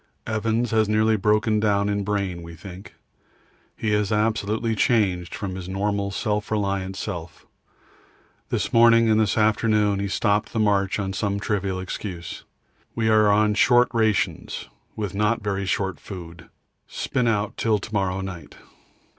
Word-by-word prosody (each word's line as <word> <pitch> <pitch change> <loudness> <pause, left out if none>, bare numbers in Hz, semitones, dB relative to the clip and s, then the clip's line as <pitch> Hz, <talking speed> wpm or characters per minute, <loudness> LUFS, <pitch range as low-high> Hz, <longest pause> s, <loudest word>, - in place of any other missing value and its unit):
Evans 110 +2 -1
has 110 -1 +2
nearly 110 +1 +3
broken 105 +1 +2
down 100 -1 +2
in 100 0 -1
brain, 100 -4 -2
we 85 0 -10
think. 90 +4 -11 0.8
He 110 - -1
is 105 -1 +1
absolutely 110 +1 0
changed 95 -6 +1
from 100 -2 -4
his 95 -1 -7
normal 100 +1 -1
self 105 +1 -2
reliant 100 -3 -1
self. 85 -5 -6 1.0
This - - -2
morning 115 -1 +6
and 110 - +4
this 110 -1 +1
afternoon 105 -1 +2
he 100 - -1
stopped 105 +2 0
the 115 - -1
march 100 -2 +2
on 95 -2 -3
some 100 0 -1
trivial 100 -2 -2
excuse. 90 -2 -6 0.5
We 110 -1 +1
are 110 -1 +5
on 105 +1 +3
short 120 +3 +4
rations 110 -3 0 0.3
with 105 -4 -4
not 105 +3 0
very 100 -1 -2
short 95 -1 -1
food; 85 -3 -10 0.4
spin 125 -2 -1
out 105 -2 0
till 110 -2 +1
to 110 +2 -9
morrow 95 -2 0
night. 90 -3 -8
105 Hz, 150 wpm, -24 LUFS, 95-110 Hz, 1.0 s, morning